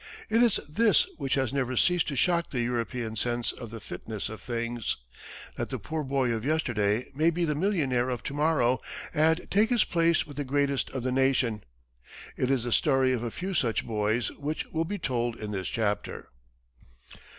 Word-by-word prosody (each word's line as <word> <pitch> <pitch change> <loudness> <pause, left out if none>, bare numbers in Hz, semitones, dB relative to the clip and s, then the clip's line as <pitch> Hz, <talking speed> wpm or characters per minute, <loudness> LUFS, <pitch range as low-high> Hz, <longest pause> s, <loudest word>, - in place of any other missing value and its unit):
It 225 +2 +4
is 235 -4 +4
this 200 +3 +4
which 135 -3 0
has 135 -2 0
never 130 -2 -1
ceased 180 -2 +3
to 140 - -2
shock 170 +5 +2
the 125 - -1
European 120 -1 -2
sense 120 +2 0
of 120 - -9
the 115 +1 -7
fitness 105 +2 -6
of 110 - -8
things 120 -1 -2 0.6
that - - -2
the - - -3
poor 160 -1 -4
boy 135 -3 +1
of 110 -1 -2
yesterday 120 -7 +1
may 155 +4 +3
be 170 +1 0
the 150 - 0
millionaire 145 -8 +1
of 125 -2 -3
to - - -4
morrow 145 -5 +2 0.3
and 160 +2 +3
take 210 +3 +4
his 240 -3 +4
place 170 -1 +2
with 145 -2 -11
the 145 - -1
greatest 140 0 0
of 130 -2 -4
the 130 - 0
nation. 125 -5 +2 0.7
It 130 - 0
is 135 -4 +2
the 120 - -3
story 135 0 +3
of 120 - -1
a 120 - -2
few 185 - -4
such 120 -9 +1
boys 110 +1 0
which 150 +2 -4
will 165 0 0
be 205 +5 -3
told 120 -7 -1
in 105 -2 -6
this 95 -3 -3
chapter. 105 -2 -2
130 Hz, 195 wpm, -28 LUFS, 120-155 Hz, 0.7 s, It